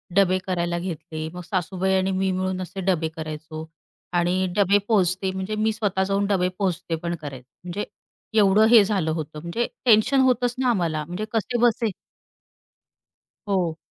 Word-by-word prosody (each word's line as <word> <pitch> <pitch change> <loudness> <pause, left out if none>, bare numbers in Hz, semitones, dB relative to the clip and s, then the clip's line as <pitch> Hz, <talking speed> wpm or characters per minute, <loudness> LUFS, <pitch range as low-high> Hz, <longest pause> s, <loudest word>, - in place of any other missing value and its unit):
डबे 185 -2 +4
करायला 175 -1 -1
घेतले. 160 -2 -5
मग 180 - -6
सासूबाई 185 +1 -1
आणि 190 +1 +1
मी 190 0 0
मिळून 185 0 -2
असे 185 +2 -6
डबे 175 -4 +1
करायचो 155 0 -6 0.5
आणि 180 +2 +2
डबे 200 0 +5
पोहोचते 190 -3 +2
म्हणजे 190 +3 -3
मी 215 +1 +1
स्वतः 200 -3 0
जाऊन 195 +1 0
डबे 185 -3 +2
पोहोचते 175 -3 -1
पण 170 0 -1
करायचे 135 -4 -8 0.2
म्हणजे 180 +4 -4 0.5
एवढं 205 +1 +5
हे 225 -3 +8
झालं 190 -6 0
होतं 155 -1 -4
म्हणजे 170 +9 -2 0.2
टेन्शन 235 +4 +5
होतंच 245 -1 +2
ना, 260 -1 +1
आम्हाला 165 -8 0
म्हणजे 180 +6 -4
कसेबसे 230 0 +1 1.6
हो. 180 -5 0
185 Hz, 150 wpm, -24 LUFS, 170-205 Hz, 1.6 s, हे